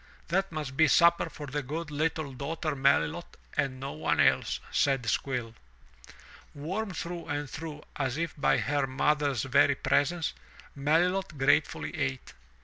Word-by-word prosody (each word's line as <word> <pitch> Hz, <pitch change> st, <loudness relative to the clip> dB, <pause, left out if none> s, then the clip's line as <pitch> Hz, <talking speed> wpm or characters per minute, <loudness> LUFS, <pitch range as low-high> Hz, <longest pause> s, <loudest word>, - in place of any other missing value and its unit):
"That 195 Hz, +2 st, +1 dB
must 150 Hz, -5 st, -5 dB
be 160 Hz, +2 st, +5 dB
supper 170 Hz, +3 st, +4 dB
for 150 Hz, -, -8 dB
the 145 Hz, +1 st, -3 dB
good 150 Hz, +4 st, -5 dB
little 155 Hz, -1 st, -1 dB
daughter 155 Hz, +4 st, -3 dB
Melilot 140 Hz, +5 st, +1 dB, 0.2 s
and 135 Hz, -3 st, -1 dB
no 135 Hz, +1 st, -4 dB
one 155 Hz, -, -1 dB
else,'* -, -, +3 dB
said 135 Hz, -4 st, +2 dB
Squill. 120 Hz, 0 st, -1 dB, 1.0 s
Warmed 185 Hz, +6 st, -4 dB
through 170 Hz, 0 st, -5 dB
and 145 Hz, 0 st, -2 dB
through 150 Hz, +1 st, -7 dB
as 135 Hz, -1 st, -1 dB
if 170 Hz, 0 st, -2 dB
by 145 Hz, -, +2 dB
her 145 Hz, -2 st, 0 dB
mother's 140 Hz, -1 st, +1 dB
very 135 Hz, +2 st, +4 dB
presence, 160 Hz, +5 st, +1 dB, 0.4 s
Melilot 165 Hz, +4 st, +1 dB
gratefully 145 Hz, +5 st, +1 dB
ate. 135 Hz, -4 st, -3 dB
145 Hz, 140 wpm, -29 LUFS, 135-165 Hz, 1.0 s, be